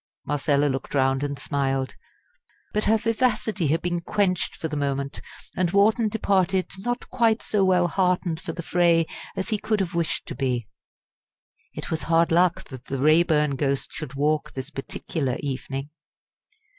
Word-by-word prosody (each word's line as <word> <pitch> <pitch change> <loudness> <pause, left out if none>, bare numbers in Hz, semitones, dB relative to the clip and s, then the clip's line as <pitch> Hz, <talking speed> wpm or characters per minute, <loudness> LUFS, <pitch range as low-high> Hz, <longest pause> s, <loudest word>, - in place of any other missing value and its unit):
Marcella 145 0 +1
looked 135 0 -2
round 135 0 +2
and 145 -1 -2
smiled. 135 -1 -1 0.8
But 210 - +1
her 220 +1 +4
vivacity 220 - 0
had 160 +4 +1
been 175 -1 -1
quenched 185 -1 0
for 160 - -4
the 155 - -5
moment; 140 -1 -2 0.3
and 180 -2 +1
Wharton 215 +4 +3
departed 190 -3 +1
not 245 +4 -3
quite 230 -3 +2
so 205 -2 +1
well 180 -2 +4
heartened 180 -2 0
for - - -4
the 170 +1 -6
fray 170 -1 +3 0.3
as 190 - -3
he 215 -2 0
could 215 0 0
have 185 -3 -1
wished 170 -2 -1
to - - -6
be. 125 -5 -1 1.1
It - - -5
was 160 - -1
hard 165 0 +4
luck 175 +1 +3
that 130 -2 -9
the 135 - -3
Raeburn 150 -1 +3
ghost 140 0 -1
should 135 -4 -6
walk 150 +2 0
this 135 +2 -5
particular 135 -1 -3
evening. 135 +1 -4
165 Hz, 160 wpm, -25 LUFS, 140-190 Hz, 1.1 s, her